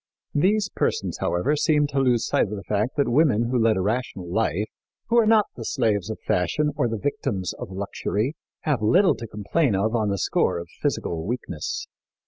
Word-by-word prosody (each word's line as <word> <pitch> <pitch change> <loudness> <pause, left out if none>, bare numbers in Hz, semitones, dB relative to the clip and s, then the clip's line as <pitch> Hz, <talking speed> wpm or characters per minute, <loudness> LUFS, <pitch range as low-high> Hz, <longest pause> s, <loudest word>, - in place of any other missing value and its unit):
These 200 +7 +2
persons, - - -1
however, 90 +13 +1
seemed 150 -1 +2
to 140 - 0
lose 125 -3 +2
sight - - +2
of 105 - -5
the 100 - -7
fact 105 +5 -1
that 140 - +2
women 120 -4 +3
who 125 - +2
lead 110 -2 +3
a - - +1
rational 105 -3 -2
life 105 +1 0 0.4
who 235 - +3
are 225 - +3
not 220 -2 +5
the - - -6
slaves 110 - 0
of 110 - -4
fashion 150 - +1
or 145 -4 +1
the 115 -1 -2
victims 100 -7 -2
of - - -8
luxury 100 +5 -2 0.3
have 145 -7 0
little 180 - +4
to 115 - -7
complain 105 +4 0
of 105 +4 0
on 110 -3 +1
the 100 - 0
score - - +1
of 85 0 -7
physical 80 -2 -1
weakness. 125 - -3
115 Hz, 195 wpm, -24 LUFS, 100-145 Hz, 0.4 s, not